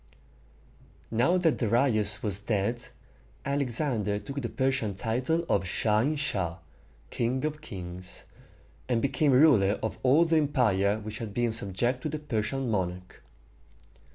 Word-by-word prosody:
Now 125 Hz, +11 st, +3 dB
that 165 Hz, -4 st, +2 dB
Darius 110 Hz, -2 st, +2 dB
was 100 Hz, -3 st, 0 dB
dead, 110 Hz, +3 st, -1 dB, 0.6 s
Alexander 125 Hz, -6 st, 0 dB
took 140 Hz, +6 st, -5 dB
the 115 Hz, -, -3 dB
Persian 130 Hz, -6 st, 0 dB
title 130 Hz, -, -1 dB
of 95 Hz, -2 st, +1 dB
"Shah 105 Hz, +3 st, +1 dB
in 145 Hz, +7 st, +1 dB
Shah" 95 Hz, -, -1 dB, 0.5 s
(king 125 Hz, +4 st, -1 dB
of 155 Hz, 0 st, -3 dB
kings), 90 Hz, -7 st, -8 dB, 0.7 s
and 120 Hz, -2 st, +2 dB
became 140 Hz, +3 st, +1 dB
ruler 125 Hz, -8 st, +5 dB
of 110 Hz, -, -3 dB
all 140 Hz, +6 st, +5 dB
the 165 Hz, -1 st, +2 dB
empire 110 Hz, -9 st, +2 dB
which 105 Hz, 0 st, -7 dB
had 105 Hz, -3 st, -6 dB
been 120 Hz, -2 st, +1 dB
subject 115 Hz, +5 st, 0 dB
to 155 Hz, -, -3 dB
the 155 Hz, -, -3 dB
Persian 125 Hz, -2 st, -2 dB
monarch. 90 Hz, -2 st, -3 dB
115 Hz, 135 wpm, -28 LUFS, 105-140 Hz, 0.7 s, ruler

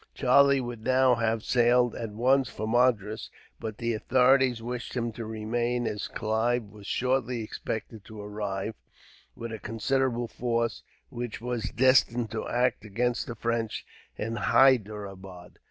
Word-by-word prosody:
Charlie 140 Hz, +1 st, +5 dB
would 120 Hz, -3 st, -6 dB
now 130 Hz, +1 st, +4 dB
have 115 Hz, -1 st, 0 dB
sailed, 120 Hz, 0 st, +3 dB
at 115 Hz, -, -5 dB
once, 130 Hz, +5 st, +2 dB
for 110 Hz, -, -5 dB
Madras; 110 Hz, -3 st, +1 dB, 0.3 s
but 110 Hz, -2 st, -5 dB
the 115 Hz, -1 st, -1 dB
authorities 130 Hz, +2 st, +3 dB
wished 120 Hz, +2 st, -5 dB
him 120 Hz, -1 st, -1 dB
to 115 Hz, 0 st, -7 dB
remain, 120 Hz, +2 st, -1 dB
as 105 Hz, -2 st, -3 dB
Clive 115 Hz, +2 st, 0 dB
was 105 Hz, -1 st, -13 dB
shortly 125 Hz, -2 st, 0 dB
expected 110 Hz, 0 st, -6 dB
to 110 Hz, -1 st, -10 dB
arrive, 105 Hz, 0 st, -4 dB, 0.6 s
with 115 Hz, 0 st, -6 dB
a 110 Hz, -, -5 dB
considerable 120 Hz, +3 st, -1 dB
force, 115 Hz, -1 st, -1 dB, 0.3 s
which 120 Hz, -2 st, -5 dB
was 120 Hz, -1 st, -3 dB
destined 125 Hz, -2 st, +3 dB
to 110 Hz, -, -4 dB
act 125 Hz, -3 st, +1 dB
against 120 Hz, +3 st, -1 dB
the 120 Hz, -, -5 dB
French 115 Hz, -1 st, -2 dB, 0.3 s
at 110 Hz, +2 st, -3 dB
Hyderabad. 100 Hz, -6 st, +1 dB
115 Hz, 140 wpm, -28 LUFS, 110-125 Hz, 0.6 s, Charlie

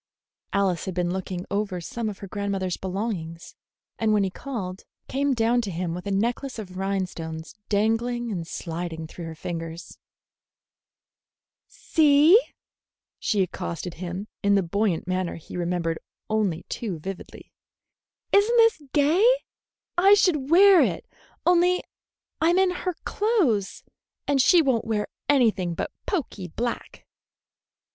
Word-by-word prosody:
Alice 190 Hz, -4 st, +1 dB
had 190 Hz, -, -4 dB
been 175 Hz, -1 st, 0 dB
looking 185 Hz, -1 st, -4 dB
over 200 Hz, -2 st, -1 dB
some 220 Hz, +6 st, -4 dB
of 200 Hz, -, -7 dB
her 200 Hz, -, -8 dB
grandmother's 195 Hz, -2 st, -2 dB
belongings, 185 Hz, -4 st, -4 dB, 0.5 s
and 220 Hz, -1 st, +2 dB
when 205 Hz, -1 st, +3 dB
he 190 Hz, -, -1 dB
called, 195 Hz, -7 st, -6 dB, 0.2 s
came 275 Hz, 0 st, 0 dB
down 235 Hz, +1 st, +2 dB
to 215 Hz, -, -4 dB
him 170 Hz, -1 st, -3 dB
with 180 Hz, +3 st, -6 dB
a -, -, -1 dB
necklace 235 Hz, +6 st, -1 dB
of 190 Hz, -4 st, -8 dB
rhinestones 180 Hz, -4 st, -3 dB, 0.2 s
dangling 225 Hz, +3 st, 0 dB
and 170 Hz, -5 st, -4 dB
sliding 165 Hz, -1 st, -5 dB
through 165 Hz, +2 st, -8 dB
her 165 Hz, 0 st, -7 dB
fingers. 165 Hz, +1 st, -6 dB, 1.7 s
"See," 310 Hz, +6 st, +5 dB, 0.8 s
she 200 Hz, -3 st, +1 dB
accosted 175 Hz, -1 st, -5 dB
him, 180 Hz, +4 st, -5 dB
in 200 Hz, -1 st, +3 dB
the 195 Hz, -, +3 dB
buoyant 190 Hz, 0 st, 0 dB
manner 185 Hz, -1 st, -1 dB
he 165 Hz, -, -10 dB
remembered 170 Hz, -2 st, -1 dB, 0.3 s
only 205 Hz, -7 st, 0 dB
too 205 Hz, -8 st, -4 dB
vividly, 190 Hz, +4 st, -9 dB, 0.8 s
"is 405 Hz, +2 st, +5 dB
n't 480 Hz, -, +3 dB
this 455 Hz, -7 st, +5 dB
gay? 305 Hz, +6 st, +4 dB, 0.8 s
I 395 Hz, +3 st, +7 dB
should 300 Hz, -9 st, +2 dB
wear 380 Hz, +2 st, +7 dB
it, -, -, 0 dB, 0.4 s
only 360 Hz, +1 st, +4 dB, 0.6 s
I'm 340 Hz, +3 st, +4 dB
in 380 Hz, -1 st, +4 dB
her 360 Hz, -1 st, -3 dB
clothes, 360 Hz, -, +1 dB, 0.4 s
and 280 Hz, -2 st, +3 dB
she 340 Hz, +5 st, +6 dB
won't 255 Hz, -5 st, +1 dB
wear 215 Hz, -2 st, -1 dB, 0.2 s
anything 220 Hz, -11 st, +3 dB
but -, -, -3 dB, 0.2 s
poky 255 Hz, -, -3 dB
black." 235 Hz, +8 st, -5 dB
200 Hz, 135 wpm, -25 LUFS, 180-275 Hz, 1.7 s, I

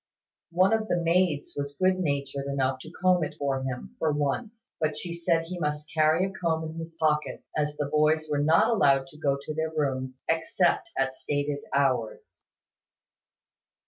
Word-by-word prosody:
One 185 Hz, +4 st, +3 dB
of 220 Hz, -1 st, +1 dB
the 175 Hz, -, +1 dB
maids 170 Hz, -3 st, +1 dB
was 140 Hz, 0 st, -4 dB
good 185 Hz, 0 st, +3 dB
natured 140 Hz, -4 st, -2 dB
enough 135 Hz, -1 st, 0 dB
to 155 Hz, -, -10 dB
comb 180 Hz, 0 st, +2 dB
it 150 Hz, -, -4 dB
for 135 Hz, -2 st, -1 dB
him, 130 Hz, -2 st, -5 dB
for 160 Hz, -, +2 dB
once: 210 Hz, -, -3 dB
but 155 Hz, -1 st, 0 dB
she 170 Hz, +1 st, -4 dB
said 170 Hz, -1 st, +1 dB
he 175 Hz, +2 st, -6 dB
must 150 Hz, -1 st, -3 dB
carry 155 Hz, +3 st, +3 dB
a 195 Hz, -, -4 dB
comb 165 Hz, -4 st, -1 dB
in 160 Hz, +1 st, -7 dB
his 165 Hz, 0 st, -8 dB
pocket; 150 Hz, -1 st, 0 dB
as 150 Hz, -1 st, 0 dB
the 145 Hz, -, -1 dB
boys 155 Hz, +2 st, +2 dB
were 145 Hz, -1 st, 0 dB
not 160 Hz, +8 st, +4 dB
allowed 140 Hz, -11 st, +4 dB
to 150 Hz, -, -15 dB
go 140 Hz, -3 st, +1 dB
to 145 Hz, +2 st, -6 dB
their 160 Hz, +1 st, -1 dB
rooms, 130 Hz, -4 st, -2 dB
except 170 Hz, -, +1 dB
at 135 Hz, 0 st, 0 dB
stated 145 Hz, +1 st, -2 dB
hours. 130 Hz, -5 st, -1 dB
155 Hz, 175 wpm, -27 LUFS, 140-170 Hz, -, not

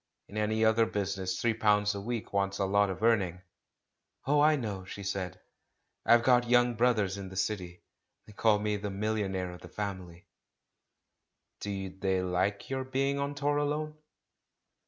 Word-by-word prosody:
In 100 Hz, -, -12 dB
any 110 Hz, +1 st, +1 dB
other 110 Hz, +1 st, +4 dB
business 95 Hz, -3 st, -2 dB
three 115 Hz, -1 st, +2 dB
pounds 105 Hz, -1 st, +2 dB
a 100 Hz, -, -5 dB
week 115 Hz, 0 st, -4 dB
wants 100 Hz, 0 st, 0 dB
a 100 Hz, -, +1 dB
lot 100 Hz, +1 st, +3 dB
of 95 Hz, +3 st, -5 dB
earning." 95 Hz, -6 st, +2 dB, 0.8 s
"Oh, 145 Hz, +2 st, +3 dB
I 155 Hz, +1 st, +5 dB
know," 105 Hz, -8 st, -4 dB
she 100 Hz, +2 st, -8 dB
said. 95 Hz, -2 st, -3 dB, 0.7 s
"I've 120 Hz, 0 st, +6 dB
got 120 Hz, -1 st, +4 dB
young 120 Hz, 0 st, +4 dB
brothers 110 Hz, -5 st, +1 dB
in 95 Hz, -1 st, -6 dB
the 95 Hz, -, -10 dB
city. 95 Hz, -2 st, -3 dB, 0.4 s
They 105 Hz, -, -14 dB
call 110 Hz, 0 st, +3 dB
me 105 Hz, 0 st, -1 dB
'the 100 Hz, 0 st, -4 dB
million 100 Hz, 0 st, -1 dB
aire 90 Hz, -1 st, -2 dB
of 90 Hz, -, -11 dB
the -, -, -11 dB
family.' 95 Hz, -3 st, -6 dB, 0.7 s
'* -, -, -54 dB
"Do 95 Hz, -2 st, -4 dB
they 95 Hz, 0 st, -1 dB
like 95 Hz, +2 st, -1 dB
your 135 Hz, 0 st, -2 dB
being 135 Hz, +2 st, 0 dB
on 140 Hz, 0 st, -2 dB
tour 145 Hz, 0 st, 0 dB
alone?" 150 Hz, +1 st, -1 dB
105 Hz, 175 wpm, -30 LUFS, 95-120 Hz, 0.8 s, I've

